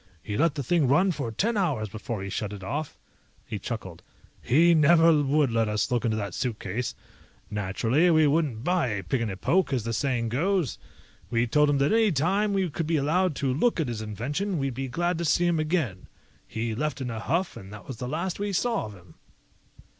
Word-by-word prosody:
He 105 - -4
let 160 +4 +2
the 140 - -3
thing 160 +1 +2
run 180 +9 +4
for 140 -8 -4
ten 220 - 0
hours 150 - 0
before 105 0 -5
he 100 - -5
shut 105 +1 -3
it 100 -2 -8
off." 145 +9 -4 0.5
He - - -5
chuckled. - - -6 0.4
"He 165 +7 +4
never 165 0 +5
would 145 -1 +2
let 115 -1 +1
us 105 +4 -1
look 120 -1 +1
into 110 -2 0
that 100 -3 -4
suitcase. 115 -1 -3 0.6
Naturally, 110 - +1
we 155 -2 +5
wouldn't 145 -6 +1
buy 175 -3 +1
a 105 -4 -3
pig 115 +9 -1
in 115 - -1
a 95 - -5
poke, 180 - +1
as 130 -5 0
the 115 +1 -3
saying 120 -1 0
goes. 170 - 0 0.5
We 115 0 +1
told 150 +5 +3
him 145 - +2
that 140 +7 +2
any 225 -2 +4
time 190 +8 +1
we 195 -2 +1
could 165 +1 -3
be 165 -1 +2
allowed 165 +4 +1
to 135 -1 0
look 205 - +1
at 150 -6 0
his 115 -2 -4
invention, 145 - -3
we'd 135 -2 -1
be 135 +2 -4
glad 175 +6 -1
to - - -1
see 170 +3 +3
him 170 -2 +2
again. 155 - -1 0.4
He 115 0 -3
left 150 +5 -2
in 125 -2 -3
a 110 - -4
huff, 170 +10 -1
and 95 +1 -10
that 105 -1 -11
was 130 - -6
the 125 +1 -5
last 170 +6 -3
we 205 0 -2
saw 230 +2 0
of 105 - -10
him." 90 -3 -17
140 Hz, 220 wpm, -26 LUFS, 115-170 Hz, 0.6 s, never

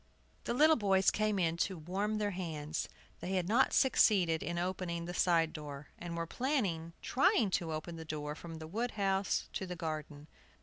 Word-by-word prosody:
The 235 - -1
little 310 +3 +6
boys 195 -3 +3
came 215 -1 0
in 170 -2 +1
to 185 +2 0
warm 195 +7 -2
their 205 -1 0
hands. 160 -4 -4 0.3
They 185 - -4
had 180 -2 0
not 240 +6 +4
succeeded 190 - +4
in 170 0 -3
opening 175 -1 -2
the 175 - -5
side 165 -3 +2
door, 145 -2 -8
and 170 -1 -5
were 165 - -1
planning 185 - -1
trying 265 - +3
to 170 -3 0
open 160 +2 -5
the 160 - -6
door 150 -1 -4
from 165 +1 -9
the 160 0 -7
wood 230 +8 -2
house 195 -1 +1
to 190 - -3
the 180 - -4
garden. 155 -3 -5
175 Hz, 185 wpm, -33 LUFS, 160-205 Hz, 0.3 s, little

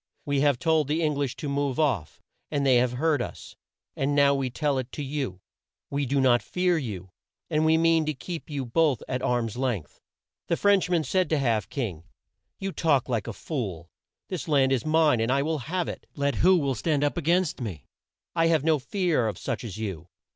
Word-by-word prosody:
We 140 -1 0
have 145 -3 +3
told 160 0 +2
the 155 +3 0
Eng 150 -1 +2
lish 140 -3 -2
to 150 - -5
move 140 -1 -1
off, 125 - 0 0.3
and 140 -1 0
they 130 -2 +5
have 125 0 +2
heard 150 +1 +1
us, - - -7 0.4
and 140 +1 0
now 140 -1 +5
we 135 -2 -1
tell 140 +1 0
it 130 0 -6
to 145 - -4
you. 135 -10 -4 0.5
We 140 -1 -1
do 140 +2 +1
not 125 -3 +4
fear 180 +7 +1
you, 100 - -5 0.4
and 155 +1 +2
we 160 0 +4
mean 165 -1 +3
to 155 - -1
keep 165 +5 -7
you 140 -3 -3
both 140 0 +1
at 125 -1 -2
arm's 120 -2 -1
length." 115 - -3 0.5
The 170 - +1
French 200 -3 +3
man 170 -3 +2
said 185 +3 +1
to 155 - +2
Half 115 -7 0
King: 100 - -4 0.5
"You 195 0 -3
talk 145 -8 +1
like 115 -4 -1
a - - -2
fool. 100 - -5 0.4
This 185 -3 -5
land 135 -4 +3
is 135 +2 0
mine, 155 -5 +4
and 115 +2 +1
I 140 +1 +2
will 155 0 -1
have 180 0 -1
it, - - -7
let 140 -1 0
who 185 +2 +6
will 140 -4 0
stand 145 +1 0
up 145 - +1
a 175 - -2
gainst 170 -1 +1
me. 90 - -5 0.5
I 165 -1 +3
have 160 -4 +2
no 160 -1 +3
fear 160 - 0
of 105 - -3
such - - -4
as 110 -5 -6
you. 95 -7 -5
140 Hz, 215 wpm, -26 LUFS, 120-160 Hz, 0.5 s, who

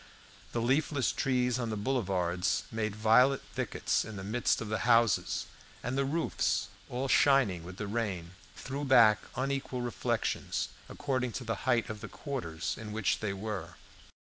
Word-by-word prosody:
The 115 - -1
leafless 135 +1 +2
trees 125 -2 +1
on 120 -2 -2
the 110 - -2
boulevards 95 -7 0
made 110 -2 -2
violet 120 +5 +4
thickets - - 0
in 110 - -8
the 95 - -6
midst 115 +5 +1
of 115 - -5
the 110 +1 -1
houses, 115 -4 +3 0.4
and 125 +2 -2
the 135 0 +1
roofs, 140 -8 0 0.2
all 125 +2 -2
shining 130 - +4
with 90 +2 -9
the 105 - -3
rain, 100 -6 -2 0.2
threw 140 +2 -5
back 115 -6 +6 0.2
unequal 135 -1 -2
reflections, 120 -5 -1 0.2
according 130 -4 -2
to 130 - -4
the 115 -1 -1 0.2
height 120 -2 +3
of 105 -1 -6
the - - -6
quarters 85 - -4
in 105 -1 -6
which 110 -2 +1
they 105 -3 -2
were. 100 -4 -5
115 Hz, 160 wpm, -31 LUFS, 105-130 Hz, 0.4 s, back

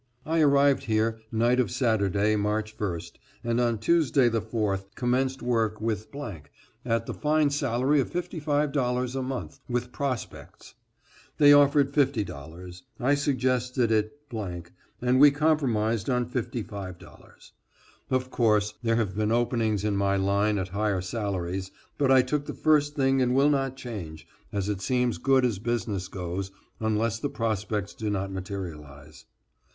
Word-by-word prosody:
I 165 +1 +1
arrived 140 -1 +4
here 110 0 0
night 120 +3 +2
of 120 -6 +2
Saturday, 105 -2 +1
March 105 +1 -1
1st, 85 -4 -4 0.3
and 120 +1 +1
on 120 -2 +1
Tuesday 135 0 +3
the 115 -1 0
4th, 105 -3 -2
commenced 130 +1 0
work 115 -3 0
with 110 -1 -2 0.8
at 115 -1 0
the - - -5
fine 150 -1 +2
salary 140 0 +1
of 135 - 0
$55 145 -7 -1
a 135 - -1
month, 130 0 -5
with 125 0 -2
prospects. 130 -3 -5 0.6
They 145 -1 +8
offered 145 -1 +5
$50; 90 - -2 0.2
I 130 +3 +2
suggested 130 -4 +1
it 110 +5 0
and 105 +5 -3
we 145 +1 +9
compromised 130 -8 +1
on 125 -1 +1
$55. 100 -7 -7 0.6
Of 130 0 -1
course, 105 -3 +2
there 115 -1 +1
have 105 -5 -1
been 110 +1 0
openings 115 -3 +1
in 105 -1 0
my 100 0 +1
line 100 +2 +1
at 95 -1 -3
higher 100 -1 0
salaries, 95 -2 -3 0.3
but 140 -2 +2
I 130 -1 +6
took 145 +3 -2
the - - -5
first 150 -1 +2
thing 135 -1 +2
and 125 0 +2
will 140 +2 +4
not 135 -2 -1
change, 85 -12 -7 0.3
as 100 -2 -2
it 100 -2 -2
seems 125 +1 0
good 135 -1 +3
as 110 -6 -1
business 105 -4 -2
goes, 95 0 -4 0.3
unless 110 +1 0
the 145 - -2
prospects 105 -4 -2
do 110 -1 -4
not 95 -1 -2
materialize. 80 -7 -8
115 Hz, 145 wpm, -27 LUFS, 100-130 Hz, 0.8 s, we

